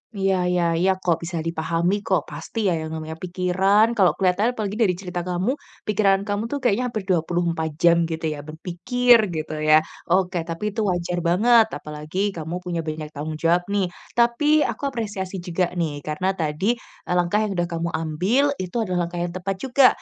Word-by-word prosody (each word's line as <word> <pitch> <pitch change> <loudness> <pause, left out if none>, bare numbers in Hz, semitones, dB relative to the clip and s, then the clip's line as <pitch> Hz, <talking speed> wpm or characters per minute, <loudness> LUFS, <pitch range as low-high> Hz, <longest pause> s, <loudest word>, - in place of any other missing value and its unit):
Iya 190 -2 +1
iya 180 -1 +1 0.2
iya 190 +2 +3
kok 170 -2 +2
bisa 165 -1 -3
dipahami 170 +4 0
kok 185 -7 +2
pasti 230 - -6
ya - - +2
yang 160 - -4
namanya 160 0 -6
pikiran. 190 +5 +2
Kalau 190 -4 +4
kelihatan 200 +6 +1
apalagi 210 +1 -3
dari 190 -5 +3
cerita 180 -1 -5
kamu, 185 +10 -1 0.2
pikiran 200 -2 +2
kamu 205 +2 -2
tuh 285 +2 -4
kayaknya 245 +2 +2
hampir 220 -4 -4
24 170 -2 0
jam 170 +1 +4
gitu 160 0 -5
ya 150 - -5
berpikir 210 - +2
gitu 155 -3 -4
ya. 155 0 +5 0.2
Oke, 180 0 +2
tapi 170 +6 -3
itu 210 0 -1
wajar 175 -1 -1
banget 220 +7 +4
apalagi 155 +7 -3
kamu 170 +1 -5
punya 175 -2 -3
banyak 155 -1 -5
tanggung 155 +1 -5
jawab 170 +3 +1
nih. 200 -3 0 0.2
Tapi 295 +6 +3
aku 280 - -2
apresiasi 200 -7 -4
juga 175 0 0
nih 155 -4 -2
karena 155 +6 -1
tadi, 190 +7 -1
eee, - - -12
langkah 190 +5 +1
yang 210 - -2
udah 175 -2 -1
kamu 170 -1 -2
ambil 165 - +1
itu 185 +1 -6
adalah 180 -5 0
langkah 175 +1 -4
yang 175 +1 -3
tepat 190 +1 -3
juga, 265 0 +5
180 Hz, 185 wpm, -23 LUFS, 165-205 Hz, 0.2 s, ya